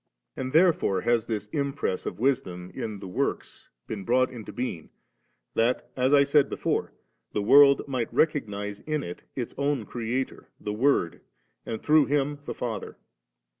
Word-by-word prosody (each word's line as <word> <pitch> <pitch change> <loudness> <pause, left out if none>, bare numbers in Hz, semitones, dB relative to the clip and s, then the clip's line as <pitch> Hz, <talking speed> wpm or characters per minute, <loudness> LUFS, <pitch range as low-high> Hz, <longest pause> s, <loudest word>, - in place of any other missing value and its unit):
* - - -57
And 130 - -4
therefore 155 - +3
has 120 -1 +1
this 105 -3 -2
impress 140 -7 -2
of - - -4
Wisdom 95 -8 -1
in 110 -2 -4
the 95 - -8
works 90 - -3 0.2
been 105 -3 -5
brought 125 +4 +2
into 115 -4 -8
being, 120 -10 -4 0.6
that, 115 +3 0
as 130 +1 +2
I 145 -1 +7
said 140 0 +3
before, - - -2 0.4
the 105 - 0
world 140 +4 +7
might 130 -4 -2
re - - +5
cognise 105 -9 -5
in 155 -2 -1
it 90 - -8
its 120 -3 -4
own 140 -5 0
Creator 120 +4 -3
the 105 - -4
Word, 115 -7 +1 0.5
and 110 - -4
through 150 -1 +5
Him 145 0 0
the - - -5
Father. 115 -5 -5
125 Hz, 165 wpm, -27 LUFS, 105-140 Hz, 0.6 s, I